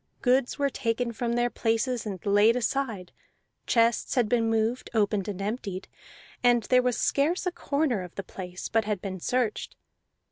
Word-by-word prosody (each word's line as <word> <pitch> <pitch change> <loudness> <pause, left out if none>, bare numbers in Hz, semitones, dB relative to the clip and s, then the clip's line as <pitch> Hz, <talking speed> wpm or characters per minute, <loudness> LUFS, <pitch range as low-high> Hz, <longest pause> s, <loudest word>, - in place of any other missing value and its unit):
Goods 255 +1 +2
were 280 -1 +1
taken 235 0 -1
from 235 +1 -2
their 240 0 +1
places 230 +1 0
and 195 -3 -4
laid 205 +3 +5
aside; 240 -7 -2 0.6
chests 230 -1 +2
had 245 -4 +3
been 230 0 +2
moved, 225 +2 0
opened, 205 -2 +1
and 200 -2 -4
emptied; 200 -2 -4 0.6
and 240 -2 +4
there 250 +2 +4
was 250 -1 0
scarce 315 +7 +1
a 360 - +1
corner 280 - 0
of 180 -1 -9
the 195 - -4
place 180 0 -7
but 225 -2 +1
had 210 -2 -1
been 190 0 -5
searched. 245 +3 -1
230 Hz, 170 wpm, -27 LUFS, 205-250 Hz, 0.6 s, laid